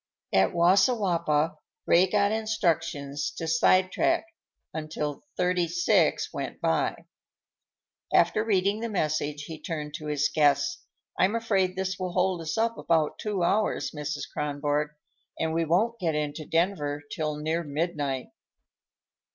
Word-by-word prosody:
At 95 0 +4
Wassiwappa, 175 -4 +2 0.3
Ray 180 +2 +5
got 200 0 +2
instructions 165 -10 -1
to 165 - -3
sidetrack 185 - +3 0.5
until 155 - -4
Thirty 180 -1 +1
six 350 +1 +2
went - - -5
by. - - 0 1.1
After 215 - +3
reading 200 -1 +1
the 230 +1 -3
message, 150 -6 -1
he 160 +1 -8
turned 150 -3 -5
to 155 - -8
his 150 -1 +1
guests. 145 -2 +2 0.4
"I'm 195 +4 +3
afraid 195 -5 +1
this 190 0 -2
will 185 -1 -3
hold 180 -1 +1
us 160 +3 -3
up 230 +1 0
about 160 -3 +1
two 205 -4 -1
hours, 210 +5 +1
Mrs. 150 -1 -4
Kronborg, 145 0 -1 0.5
and 160 0 0
we 165 0 +1
won't 220 +9 +1
get 165 -5 0
into 150 +1 -3
Denver 160 -4 0
till 155 -1 -2
near 160 +3 -1
midnight." 145 -3 -2
165 Hz, 130 wpm, -27 LUFS, 150-190 Hz, 1.1 s, Ray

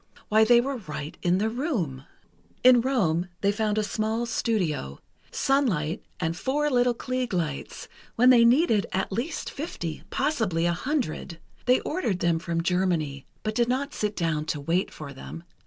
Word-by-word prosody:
Why, 220 +1 +5
they 235 +2 +6
were 270 +2 -1
right 150 -7 -6
in 175 +1 +2
the 210 +3 +1
room! 220 - -2 0.6
In 250 -1 +7
Rome 185 -10 +1
they 200 - +3
found 210 0 -1
a 215 - +2
small 220 +2 -1
studio—sunlight, 190 - -1 0.2
and 165 -1 -1
four 290 +8 0
little 245 -1 +3
Klieg 255 -2 -3
lights, 160 -6 -3 0.3
when 250 +2 +6
they 240 -2 +7
needed 235 - +4
at 190 +1 -1
least 240 - -3
fifty, 170 - -5
possibly 220 - 0
a 175 - +2
hundred. 205 - -2 0.3
They 250 +1 +4
ordered 295 - -1
them 170 -2 +1
from 165 -1 -2
Germany, 170 -7 0 0.2
but 215 - -1
did 235 +1 +1
not 275 +3 -1
sit 210 0 -2
down 160 -3 -1
to 155 -2 -2
wait 165 +6 0
for 145 -2 -9
them. 165 +5 -9
210 Hz, 160 wpm, -26 LUFS, 165-245 Hz, 0.6 s, In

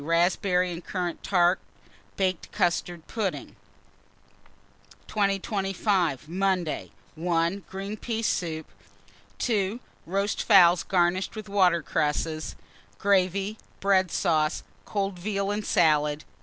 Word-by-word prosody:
Raspberry 180 +3 +2
and 170 0 -6
currant 180 -3 -3
tart, 180 -1 +3 0.6
baked 185 -3 -1
custard 175 -3 -1
pudding. 210 -4 -3 1.5
2025. 195 - 0
Monday. 180 -2 -1 0.2
1. 170 +3 0
Green 195 +2 -5
pea 225 +1 -3
soup. 160 -6 -1 0.7
2. 215 -1 0 0.3
Roast 195 +3 0
fowls 180 -5 +6
garnished 180 +3 +1
with 215 -1 -7
water 185 -5 +3
cresses; 155 +2 -1 0.4
gravy, 195 +1 +1 0.2
bread 190 -2 +3
sauce; 155 -3 +1 0.2
cold 195 -3 -2
veal 200 +1 -1
and 210 +1 -2
salad. 150 -4 +3
185 Hz, 100 wpm, -27 LUFS, 170-200 Hz, 1.5 s, fowls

